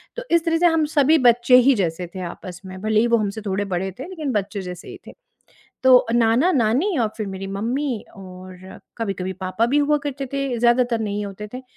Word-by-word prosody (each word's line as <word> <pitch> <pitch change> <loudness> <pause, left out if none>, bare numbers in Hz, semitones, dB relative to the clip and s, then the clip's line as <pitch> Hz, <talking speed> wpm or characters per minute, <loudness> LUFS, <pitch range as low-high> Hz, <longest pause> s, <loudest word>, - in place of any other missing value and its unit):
तो - - -5
इस 335 0 +3
तरह 330 0 +2
से 350 - +2
हम 325 -2 +2
सभी 295 +2 +5
बच्चे 240 +1 +5
ही 275 - +7
जैसे 175 -3 -2
थे - - -5
आपस 180 -2 -11
में। 185 0 -9
भले 215 0 +1
ही 235 - +3
वो 235 0 +3
हमसे 210 0 -3
थोड़े 200 +1 -1
बड़े 190 +2 -2
थे, 265 - -6
लेकिन 310 -7 -4
बच्चे 200 -1 -2
जैसे 180 -1 -8
ही - - -9
थे। - - -10 0.7
तो 260 -1 +7
अ, 230 - -4
नाना-नानी 250 - +2
और 225 - +1
फिर 215 - -4
मेरी 195 0 -6
मम्मी 235 +5 -3
और 185 -1 -12 0.2
कभी-कभी 190 -4 -3
पापा 185 +5 0
भी 275 +5 +2
हुआ 295 +1 +2
करते 275 -1 -4
थे, 275 -3 -2
ज़्यादातर 240 0 +2
नहीं 205 -1 -3
होते 205 +1 -8
थे। 255 - -6
225 Hz, 215 wpm, -21 LUFS, 195-270 Hz, 0.7 s, ही